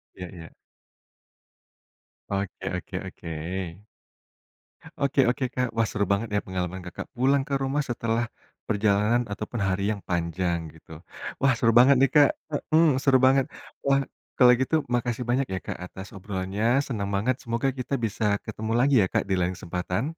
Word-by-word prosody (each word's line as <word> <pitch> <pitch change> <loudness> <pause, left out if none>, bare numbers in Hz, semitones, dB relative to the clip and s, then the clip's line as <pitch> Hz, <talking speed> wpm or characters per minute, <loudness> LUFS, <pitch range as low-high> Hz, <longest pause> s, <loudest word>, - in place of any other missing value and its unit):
Iya 90 - -7
iya. 80 -3 -11 1.8
Oke 100 0 -3
oke - - -8
oke. - - -10 1.7
Oke 140 0 0
oke, 130 +2 -1
Kak, 125 -1 0
wah, 115 0 +3
seru 100 -1 -1
banget 100 +3 +1
ya, 100 - +3
pengalaman 95 0 -3
Kakak 90 - -6
pulang 135 +3 +2
ke 140 - -5
rumah 135 +2 0
setelah 115 -1 -1 0.4
perjalanan 105 +2 +2
ataupun 105 +2 -4
hari 95 0 0
yang 100 - -8
panjang, 85 0 0
gitu. 80 0 -18 0.5
Wah, 135 -2 +4
seru 115 0 +3
banget 130 +3 +8
nih, 135 - +5
Kak, 145 -2 +7 0.4
mhm, 160 -4 +5
seru 135 -2 +5
banget. 135 0 +4 0.4
Wah, 140 0 +4 0.4
kalau 125 -2 +8
gitu 130 +5 +1
makasih 120 0 -1
banyak 130 +3 +2
ya, 95 - -1
Kak, - - -4
atas 95 +2 -9
obrolannya, 95 +2 -3 0.2
senang 100 -6 -3
banget, 120 +6 +1
semoga 115 +3 -1
kita 125 +2 -4
bisa 110 0 -3 0.2
ketemu 110 0 -4
lagi 135 +2 +4
ya, - - +1
Kak, - - +2
di 95 - +2
lain 90 0 0
kesempatan. 90 +4 -3
115 Hz, 160 wpm, -26 LUFS, 95-130 Hz, 1.8 s, banget